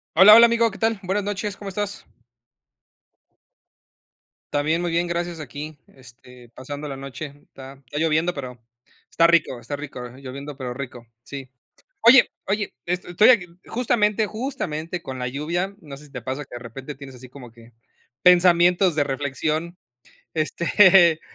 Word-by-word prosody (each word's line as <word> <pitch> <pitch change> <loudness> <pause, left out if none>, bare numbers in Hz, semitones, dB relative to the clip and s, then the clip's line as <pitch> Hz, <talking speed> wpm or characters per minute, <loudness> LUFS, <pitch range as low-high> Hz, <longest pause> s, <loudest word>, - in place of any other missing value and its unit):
Hola, 195 +5 +9
hola, 235 +1 +9
amigo. 235 0 +2
¿Qué - - -11
tal? 225 -2 0
Buenas 195 +3 -1
noches. 205 0 -3
¿Cómo 200 - -7
estás? 205 +1 -4 2.5
También, 155 +3 +1
muy 175 -1 -2
bien, 170 +1 0
gracias. 170 -1 -3
Aquí, 150 +2 -8 0.2
este, 125 -1 -16
pasando 145 +5 -8
la 135 - -6
noche 140 +3 -7 0.2
está 135 0 -13
está 135 +4 -8
lloviendo, 160 +2 +1
pero 130 -4 -8 0.5
está 165 - +3
rico 170 -6 +3
está 145 +5 -5
rico, 140 -4 -8
lloviendo, 140 +1 -8
pero 125 -3 -5
rico. 125 -3 -8 0.2
Sí. 135 -1 -9 0.5
Oye 245 +3 +7 0.2
oye, 205 +1 -2
es 180 +1 -2
estoy 180 +6 +4
aquí, 220 -8 +5 0.2
justamente, 220 -3 +1
justamente, 185 - -4
con 130 -1 -7
la 125 - -2
lluvia, 170 +8 -3
no 145 -4 -10
sé 150 - -13
si - - -19
te 125 -3 -7
pasa 130 +5 -4
que, 125 - -11
de - - -6
repente, 130 +5 -9
tienes 135 -1 -11
así 125 0 -13
como 125 -2 -12
que 115 0 -17 0.5
pensamientos 180 0 +5
de 150 - +2
reflexión, 150 +5 -3 0.6
este 170 +1 +4
155 Hz, 155 wpm, -23 LUFS, 135-185 Hz, 2.5 s, Hola